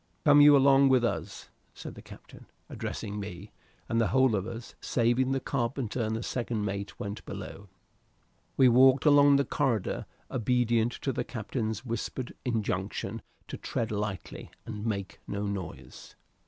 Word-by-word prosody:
"Come 145 -1 +7
you 145 0 +8
along 135 0 +5
with 130 -2 +4
us," - - -4 0.2
said - - -8
the - - -11
captain, - - -14 0.2
addressing 105 -2 -5
me, 100 0 -8 0.4
and 115 0 +1
the 115 - +2
whole 130 -2 +3
of 100 +1 -2
us, 115 0 -8
saving 120 +2 +1
the 135 - +1
carpenter 125 -2 -2
and 110 +1 -2
second 115 -4 -2
mate, 100 0 -5
went 100 +1 -5
below. 100 0 -8 0.9
We 130 - +7
walked 130 +3 +5
along 145 -1 +6
the 140 0 +3
corridor 125 -9 -1 0.2
obedient 120 -1 +1
to 135 - 0
the - - -2
captain's 110 -1 -4
whispered 120 +1 -4
injunction 110 -5 -2 0.3
to - - -6
tread 115 0 -3
lightly, 105 -2 -4 0.2
and 110 0 -5
make 100 -3 -3
no 100 0 -3
noise. 90 -11 -7
115 Hz, 150 wpm, -29 LUFS, 105-130 Hz, 0.9 s, you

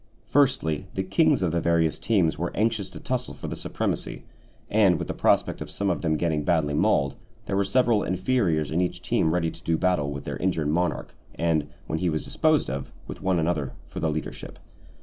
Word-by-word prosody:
Firstly, 95 - +2
the 95 - 0
kings 145 - +3
of 85 - +1
the 85 0 0
various 85 -1 +2
teams 95 -8 +2
were 85 +1 -2
anxious 110 -2 0
to - - -10
tussle 125 -1 -3
for - - -7
the - - -4
supremacy; - - -3 0.4
and 100 -5 +4
with - - -4
the - - -2
prospect - - +2
of - - -5
some 100 -1 -1
of 85 - -2
them 80 -3 +1
getting 80 -3 0
badly 80 -4 +1
mauled, 70 -1 +2 0.3
there 95 - -2
were 100 - +3
several 115 +1 +3
inferiors 95 - +1
in 85 +3 +1
each 90 - -2
team 80 - +2
ready 85 -1 0
to - - -14
do 85 -1 0
battle 90 -6 +1
with 70 0 -5
their - - -4
injured 80 -5 0
monarch, 85 +3 -1 0.2
and, 80 -3 +1 0.2
when 80 - -2
he 90 - +1
was 75 -1 -1
disposed 155 -2 +2
of, 65 +1 -4
with - - -8
one 95 -1 +1
another, 80 -5 0
for - - -7
the 80 - +1
leadership. 75 0 -5
85 Hz, 210 wpm, -26 LUFS, 80-100 Hz, 0.4 s, and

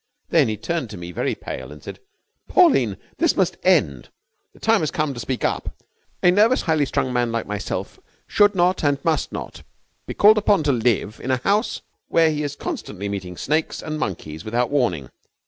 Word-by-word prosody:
Then - - +4
he 110 -1 -2
turned 155 +2 -3
to 105 - -8
me, 85 0 -7
very - - -2
pale, - - -7
and 75 - -12
said: - - -8 0.5
'Pauline, 130 - +4 0.2
this - - +3
must - - +1
end! 70 -4 +2 0.4
The - - -21
time 225 -1 +3
has 155 - -1
come 155 -2 -1
to 120 - -8
speak 125 +1 -3
up. - - -2 0.5
A 180 - +6
nervous, 215 +7 +3
highly 155 -3 +2
strung 130 -1 -1
man 120 -1 +1
like 115 -1 -2
myself 105 0 -5 0.3
should 205 -1 +3
not, 180 0 +2
and 145 -1 +2
must 160 -3 0
not, - - -7 0.5
be - - -5
called 215 +1 +6
upon 200 -5 +2
to 145 - +2
live 115 -3 0
in 130 - -4
a 130 - +2
house 200 - 0 0.2
where 165 -1 +3
he 150 -1 -2
is 145 -1 -3
constantly 105 - -5
meeting 90 -3 -5
snakes 155 +2 -1
and 155 0 -4
monkeys 80 - -5
without 120 +4 -1
warning. 100 - 0
135 Hz, 195 wpm, -22 LUFS, 105-170 Hz, 0.5 s, A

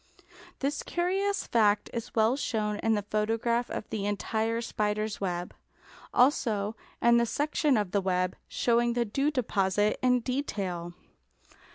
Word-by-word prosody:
This 280 +2 -1
curious 390 +3 -1
fact 210 -3 +3
is 235 0 -5
well 225 +2 +4
shown 215 -6 -1
in 225 0 +2
the 205 - -1
photograph 225 +3 0
of - - -5
the 205 -2 -2
entire 220 +2 -1
spider's 215 -2 -2
web, 175 -2 -3 0.6
also 225 -5 +2 0.3
in 235 0 +6
the 235 0 +2
section 295 0 +1
of 205 -3 -1
a 200 - +2
web, 185 -1 0
showing 235 0 +2
the 240 0 +1
dew 275 +7 0
deposit 210 -6 +1
in 250 -1 +3
detail. 195 -10 -3
225 Hz, 140 wpm, -29 LUFS, 205-250 Hz, 0.6 s, in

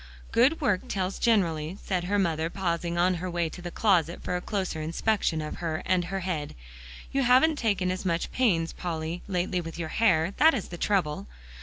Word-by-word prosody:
"Good 260 +8 +4
work 205 -10 +1
tells 190 -1 -2
generally," 175 -6 +1
said 180 -3 -1
her 205 +3 +1
mother, 165 -4 0
pausing 170 -2 -2
on 180 +2 +3
her 185 - -3
way 170 -2 -1
to 180 - -10
the 175 - -5
closet 175 -4 +1
for 180 - -2
a 180 - -2
closer 185 -5 -3
inspection 165 0 0
of 150 - -6
her 160 -2 -3
and 180 -2 +2
her 195 +2 -3
head; 165 -5 -3 0.6
"you 275 - +1
haven't 265 +5 +4
taken 200 -7 +1
as 185 - -4
much 170 -2 -1
pains, 175 -10 +1
Polly, 165 0 -4
lately 180 -1 -1
with 165 -1 -8
your 165 -2 -4
hair; 180 -4 +2
that 320 0 +6
is 220 - -4
the 175 - -7
trouble." 175 - 0
180 Hz, 195 wpm, -27 LUFS, 165-200 Hz, 0.6 s, that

